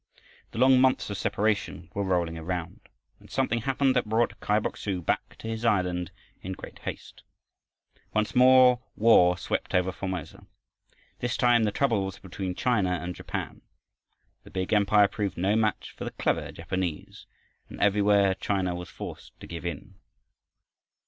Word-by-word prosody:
The - - -10
long 130 +1 +5
months 130 -5 +2
of 100 - -3
separation 100 -4 -1
were 100 - -2
rolling 90 -3 0
around, 85 +1 -4 0.4
when - - -18
something 115 0 0
happened 135 +2 +1
that 120 -4 0
brought 115 +2 +1
Kai 105 - +1
Bok 110 - -2
su 95 -3 -3
back 85 - -2
to - - -8
his 115 0 -4
island 90 -6 +1 0.3
in 95 - -5
great - - -10
haste. - - -8 0.9
Once 110 0 0
more 125 -1 +6
war 90 -6 +5
swept - - -3
over 90 +1 +2
Formosa. 95 -4 -6 0.7
This 120 0 -2
time 120 -2 +4
the 105 - 0
trouble 115 -5 +1
was 95 0 -5
between 95 -1 -5
China 110 -7 +1
and 90 +3 -5
Japan. - - -6 0.8
The - - -14
big 95 +1 -2
Empire 105 0 +5
proved 100 -1 -3
no 95 +4 +1
match 110 -1 0
for - - -7
the - - -3
clever - - -1
Japanese, 85 0 -5 0.4
and - - -10
everywhere 100 -1 +4
China 95 -2 -1
was 90 0 -7
forced - - -9
to - - -10
give 85 0 -6
in. 80 -5 -7
100 Hz, 160 wpm, -27 LUFS, 90-115 Hz, 0.9 s, more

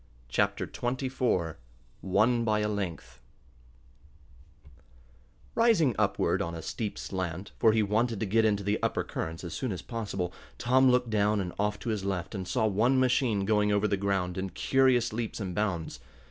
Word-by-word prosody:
Chapter - - +1
Twenty 125 +2 -3
Four 95 - -1 0.4
Won 110 +5 +2
by 105 -2 +1
a 105 - +1
Length 95 -11 -5 2.3
Rising 225 - +4
upward, - - +1
on 85 0 -3
a 80 - -7
steep 105 -3 -4
slant, 95 0 -4
for 110 - +5
he 110 0 +2
wanted 110 +2 0
to 110 - -1
get 110 +3 +2
into 105 -2 +2
the 100 +2 0
upper - - 0
currents 80 +1 -5
as 85 - -6
soon 130 -4 -2
as 90 -2 -5
possible, 100 -6 -4 0.2
Tom 130 +2 +4
looked 125 -2 +2
down 105 0 +2
and 90 -3 -3
off 105 0 0
to - - -3
his 105 -3 -1
left 95 -1 -3
and 95 -3 -4
saw 90 +5 +1
one 115 +6 +3
machine 125 -5 +2
going 105 0 +2
over 105 +1 +2
the 100 - +1
ground 95 -2 -1
in 95 0 -3
curious 130 +4 +2
leaps 115 0 -3
and 95 -4 -4
bounds. 90 -4 -2
105 Hz, 175 wpm, -29 LUFS, 95-120 Hz, 2.3 s, for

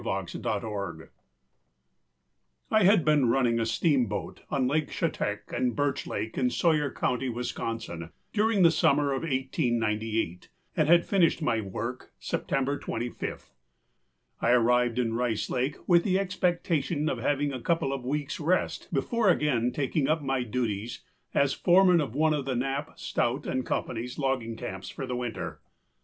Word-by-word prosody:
BRACKLIN 100 -7 -3 1.6
I 215 -1 +4
had 195 -3 +5
been 150 -5 +4
running 120 -2 +2
a 115 - 0
steamboat 125 - 0
on 130 -2 +1
Lake 150 +2 0
Chetak - - -2
and 125 -1 0
Birch 145 -1 -1
Lake 110 +4 -3
in 125 -1 +2
Sawyer 145 +4 +2
County, 125 +1 -1
Wisconsin, 115 -7 -4 0.2
during 210 -2 +3
the 165 - +7
summer 145 -2 +3
of 135 - -2
1898 115 - -1 0.3
and 155 - +2
had 170 +1 +5
finished 175 -4 +2
my 115 -5 +1
work 110 +5 -5
September 135 +1 -1
25. 120 +1 -5 0.9
I - - +2
arrived 120 0 +3
in 115 -2 0
Rice 115 -2 -1
Lake 130 +4 0
with 170 -2 +5
the 190 -2 +2
expectation 175 -5 0
of 130 - -1
having 145 +3 0
a 130 - -5
couple 165 -3 0
of 135 - -3
weeksâ 145 +4 -3
rest 180 +4 0
before 200 - +1
again 130 -8 +2
taking 140 +1 0
up 155 0 +1
my 135 -1 0
duties 115 -2 -3 0.3
as 140 -1 +3
foreman 180 -1 +5
of 130 -5 -4
one 155 +1 +3
of 140 -3 -2
Knapp, 135 +3 -2
Stout, 120 +4 -1
and 130 -1 -2
Companyâs 125 +1 -3
logging 130 -5 -1
camps 95 -3 -6
for 135 - -5
the 125 -1 -3
winter. 120 -2 -4
135 Hz, 145 wpm, -28 LUFS, 120-155 Hz, 1.6 s, the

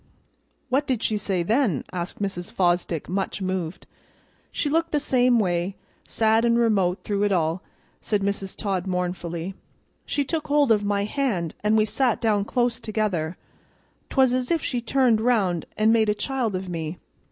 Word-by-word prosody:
"What 275 +3 +1
did 250 -4 -1
she 215 - +1
say 190 -3 -1
then?" 220 - +1
asked 175 0 -4
Mrs. 195 -3 -3
Fosdick, 175 -3 0
much 195 +2 -2
moved. 185 -3 -3 0.7
"She - - -1
looked 330 +3 +1
the 295 - +2
same 250 -3 +3
way, 180 -2 0 0.3
sad 220 0 +2
an' 235 0 +3
remote 200 -6 +2
through 205 -1 -1
it 205 0 +2
all," 170 -1 +1 0.4
said 210 -2 -1
Mrs. 200 -1 -2
Todd 195 -3 -2
mournfully. 180 -1 -3 0.5
"She 285 - 0
took 315 +2 -2
hold 290 -3 +3
of 210 -2 +3
my 200 0 0
hand, 210 - -1
and 215 +1 +3
we 215 - +4
sat 230 +2 +1
down 210 -3 +1
close 240 0 0
together; 200 -7 -2 0.7
'twas 260 -3 +3
as 255 -1 -1
if 330 -3 +1
she 245 -2 -1
turned 240 -2 +2
round 200 -9 +1
an' 215 +1 +4
made 220 -2 +3
a 210 - +2
child 235 -1 -1
of 185 +1 -4
me. 165 -1 -4
210 Hz, 170 wpm, -24 LUFS, 185-240 Hz, 0.7 s, we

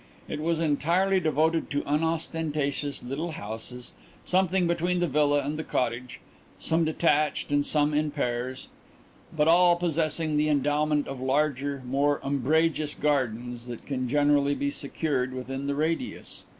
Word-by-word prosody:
It 150 - -4
was 165 +1 0
entirely 170 +5 +2
devoted 160 0 +1
to 145 0 -1
unostentatious 150 -2 -1
little 150 +7 -4
houses, 115 +2 -6 0.3
something 185 0 +2
between 175 +1 0
the 175 - +2
villa 145 -1 +2
and 150 +2 -3
the - - -2
cottage, 125 -1 -2 0.4
some 165 +1 +1
detached 155 -2 +1
and 145 0 +3
some 150 0 +2
in 150 +1 +1
pairs, 130 -2 -3 0.6
but 150 -1 +1
all 175 +1 +6
possessing 160 -2 0
the 150 +1 +2
endowment 150 +1 +1
of 135 -2 -6
larger, 140 0 0
more 140 +3 +1
umbrageous 150 +3 +1
gardens 125 -4 -1
than 120 -1 -5
can 130 -1 -4
generally 145 0 +3
be 140 0 -1
secured 135 -3 -2
within 135 +2 -5
the 140 - -1
radius. 165 - -3
145 Hz, 140 wpm, -27 LUFS, 135-160 Hz, 0.6 s, all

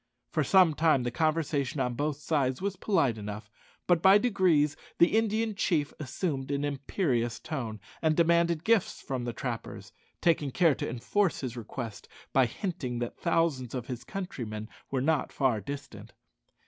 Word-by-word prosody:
For 155 - +1
some 180 +1 +5
time 155 -4 +3
the 120 - -2
conversation 150 -2 0
on 125 -2 0
both 145 +3 -1
sides 140 -4 0
was 195 0 -2
polite 140 - +1
enough, 105 0 -7 0.3
but 175 -2 +3
by 195 +2 +8
degrees 185 - +3 0.2
the 170 +5 +5
Indian 220 0 +1
chief 160 -6 0
assumed 140 -1 -3
an 140 0 0
imperious 135 - -1
tone, 125 -9 -5 0.2
and 155 -1 +2
demanded 170 -1 +3
gifts 225 -1 +2
from 130 -3 -4
the 120 - -2
trappers, 115 0 -5 0.3
taking 155 -4 +2
care 165 +3 +4
to - - -4
enforce 170 - 0
his 125 -3 -4
request 115 -1 -6 0.3
by 130 -2 +5
hinting 130 - -4
that 120 0 -3
thousands 165 -8 0
of 125 -2 -3
his 125 -2 -6
countrymen 115 - -5 0.2
were 135 -2 -1
not 155 +2 +1
far 125 -6 +1
distant. 115 -4 -8
145 Hz, 160 wpm, -29 LUFS, 125-170 Hz, 0.3 s, by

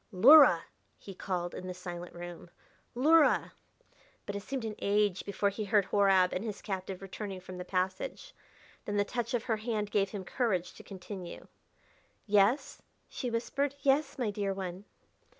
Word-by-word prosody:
"Luhra!" 230 - +8 0.3
he 195 - -10
called 180 -2 -3
in 185 - -7
the 180 - -5
silent 175 -1 -8
room. 175 0 -9 0.5
"Luhra!" 305 +5 +4 0.7
But 205 - -5
it 200 - -3
seemed 260 +2 -4
an 220 - -3
age 205 -2 +1
before 200 0 0
he 210 +2 -5
heard 200 -1 +3
Horab 195 -2 +3
and 185 - -2
his 210 -3 -6
captive 190 -1 -5
returning 195 0 -6
from 185 0 -9
the - - -4
passage. 185 0 -3 0.5
Then 205 0 -2
the 205 - +2
touch 240 +2 -2
of 235 - -1
her 225 -3 0
hand 215 -2 -3
gave 195 -2 +2
him 200 -2 -6
courage 185 -6 -1
to - - -13
continue. 185 -2 -8 0.8
"Yes?" 210 +5 +2 0.3
she 250 - -4
whispered; 270 +4 -1
"yes, 280 +2 +2
my 240 -5 -1
dear 200 -1 -2
one?" 190 0 -6
200 Hz, 165 wpm, -31 LUFS, 185-225 Hz, 0.8 s, Luhra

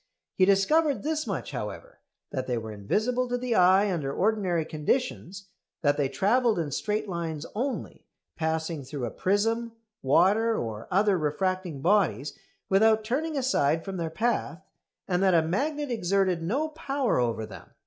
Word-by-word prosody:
He 185 - +4
discovered 275 +10 +3
this 310 +1 -1
much, - - -4
however, - - -7 0.3
that 130 - -3
they 125 -2 0
were 110 -1 -5
invisible 220 - -1
to 245 0 -1
the 245 -1 -2
eye 190 +1 +5
under 145 -5 -2
ordinary 185 -3 0
conditions; 190 - -2 0.3
that 145 -1 +3
they 145 -2 0
travelled 220 - +2
in 160 -4 -2
straight 210 +8 -2
lines 165 -4 -4
only, 255 +5 -4 0.3
passing 160 -2 -2
through 130 -1 -5
a 115 - -4
prism, 225 +4 0 0.3
water, 200 +11 +3
or 110 -2 -5
other 195 0 +3
refracting 175 0 -2
bodies 150 - +2 0.3
without 220 +3 +4
turning 295 +7 -2
aside 165 - +1
from 195 -1 -5
their 165 -2 -2
path; 195 -2 -1 0.4
and 180 -1 0
that 190 -2 +4
a 165 - +4
magnet 290 - -1
exerted 190 -4 +1
no 265 - -1
power 275 - -1
over 115 -2 0
them. 95 -5 -12
190 Hz, 155 wpm, -27 LUFS, 160-230 Hz, 0.4 s, eye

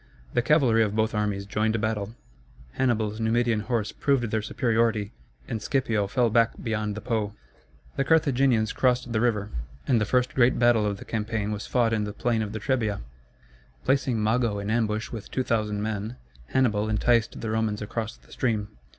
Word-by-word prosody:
The - - +3
cavalry 125 -4 +4
of 105 -1 +1
both 110 +1 +1
armies 105 -2 -1
joined 110 +2 0
battle, 110 0 -2 0.6
Hannibal's 110 - 0
Numidian 115 0 +2
horse 105 -1 -1
proved 140 -3 +1
their 110 - +1
superiority, 110 -1 0 0.4
and 110 - -3
Scipio 110 -5 0
fell 120 +3 +1
back 115 0 +3
beyond 105 -2 -2
the 110 - -6
Po. 110 -3 -2 0.6
The 135 - +2
Carthaginians 135 -8 +3
crossed 125 -1 +1
the 110 - +1
river, 105 -4 0 0.4
and 120 -5 +3
the - - +2
first 125 +3 +1
great 125 -1 +4
battle 120 -3 +4
of 100 -1 -2
the - - -11
campaign 110 -1 -2
was 105 0 -4
fought 120 -3 +2
in 105 -1 0
the 105 - -5
plain 115 0 0
of 105 -1 -3
the 110 - -4
Trebia. 110 -4 -1 0.8
Placing 130 -4 +1
Mago 110 -1 +1
in 100 +1 -3
ambush 110 -1 0
with 110 -4 -7
2,000 105 -5 -1
men, 110 +2 -3 0.3
Hannibal 110 -5 +1
enticed 115 +1 +2
the 110 - -3
Romans 110 -1 0
across 110 +1 -4
the - - -23
stream. 110 -5 -1
110 Hz, 175 wpm, -26 LUFS, 105-120 Hz, 0.8 s, cavalry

